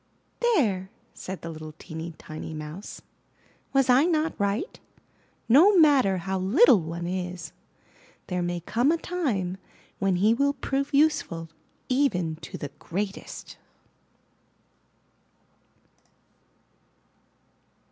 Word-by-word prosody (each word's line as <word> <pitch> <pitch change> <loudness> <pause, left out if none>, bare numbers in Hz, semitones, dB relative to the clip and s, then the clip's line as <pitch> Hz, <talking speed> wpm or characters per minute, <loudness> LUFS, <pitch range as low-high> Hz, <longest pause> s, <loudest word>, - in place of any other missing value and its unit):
'There," 230 - +1 0.2
said 190 0 -7
the 165 - -5
little 155 -1 -9
teeny, 160 0 -7
tiny 155 +1 -8
Mouse, 155 +6 -8 0.7
"was 270 -1 +3
I 255 +4 +5
not 320 -2 +1
right? 205 - -1 0.7
No 350 - +6
matter 275 - +5
how 190 +2 -2
little 210 - +5
one 165 +2 -5
is, 180 -3 -4 0.7
there 180 0 -2
may 175 0 -2
come 240 - +1
a 335 - +2
time 235 - -2 0.4
when 195 -1 +2
he 205 +5 +4
will 280 +4 +2
prove 275 0 -2
useful 280 - +1 0.4
even 185 - +1
to 160 - -8
the 145 - -5
greatest." 195 +3 -5
195 Hz, 105 wpm, -26 LUFS, 170-280 Hz, 0.7 s, No